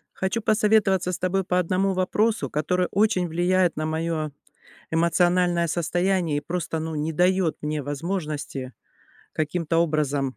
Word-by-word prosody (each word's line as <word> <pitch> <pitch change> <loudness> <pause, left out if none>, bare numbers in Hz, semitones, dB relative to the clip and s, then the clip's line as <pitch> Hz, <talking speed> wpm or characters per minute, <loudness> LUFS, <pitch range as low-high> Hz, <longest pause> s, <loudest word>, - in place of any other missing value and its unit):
Хочу 190 +4 -1
посоветоваться 210 -4 +2
с 175 - -3
тобой 185 +1 0
по 180 0 +1
одному 185 +2 +1
вопросу, 210 +4 0
который 180 +5 0
очень 195 -3 +2
влияет 175 +1 +1
на 155 - -2
моё 160 -1 -2 0.6
эмоциональное 175 +1 +2
состояние 175 0 0
и - - -2
просто, 170 +1 -3
ну, 160 0 -4
не 155 +2 -2
дает 180 0 +2
мне 150 0 -2
возможности 145 -4 -4 0.6
каким-то 165 +1 -1
образом 145 -5 0
175 Hz, 135 wpm, -24 LUFS, 155-185 Hz, 0.6 s, посоветоваться